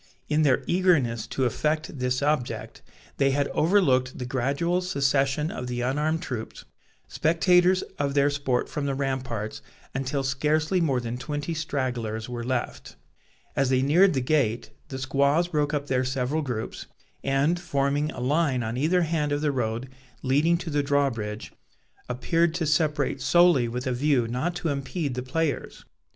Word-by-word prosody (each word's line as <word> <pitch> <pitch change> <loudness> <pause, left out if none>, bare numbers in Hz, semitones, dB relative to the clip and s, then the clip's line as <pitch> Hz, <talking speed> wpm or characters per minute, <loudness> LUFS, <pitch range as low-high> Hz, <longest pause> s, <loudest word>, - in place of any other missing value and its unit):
In 150 +1 +2
their 140 -5 +3
eagerness 155 - +2
to 130 - -1
effect 155 +4 -1
this 125 +1 0
object, 145 -4 -2 0.4
they 135 -1 +3
had 140 +1 0
overlooked 140 -8 +2
the 125 - -4
gradual 140 +8 0
secession 140 -3 +1
of 125 - -5
the 120 0 -3
unarmed 150 +6 0
troops, 115 -3 -6 0.4
spectators 180 +3 +3 0.2
of 140 -1 -1
their 140 0 +4
sport 140 -3 0
from 145 -1 -3
the 135 - -1
ramparts, 130 -6 -3 0.3
until 135 +1 -2
scarcely 155 +7 +1
more 135 -6 +1
than 120 0 -5
twenty 145 +4 -3
stragglers 125 -8 -3
were 120 -1 -5
left. 125 0 -3 0.6
As 135 -1 +2
they 130 0 +2
neared 170 +5 +4
the 130 - +1
gate, 125 -4 0 0.2
the 135 - -6
squaws 140 +5 +1
broke 150 -3 0
up 145 -2 -1
their 130 -2 +1
several 130 +4 -1
groups, 125 -6 -5 0.4
and, 140 +6 +1
forming 145 -3 0
a - - -8
line 135 -1 +1
on 110 +2 -3
either 170 +6 +2
hand 155 -2 -1
of 145 0 0
the 150 -1 +1
road 120 -1 -2 0.4
leading 150 +6 +3
to 170 -2 -6
the 145 0 +2
drawbridge, 135 -7 -1 0.6
appeared 165 +7 +1
to 165 - -1
separate 150 -2 +1
solely 155 -2 +4
with 125 +2 -4
a 130 - 0
view 130 -2 +2
not 130 +9 -2
to 175 -2 -2
impede 140 +1 -2
the 125 - -3
players. 145 +3 -3
140 Hz, 160 wpm, -26 LUFS, 125-155 Hz, 0.6 s, their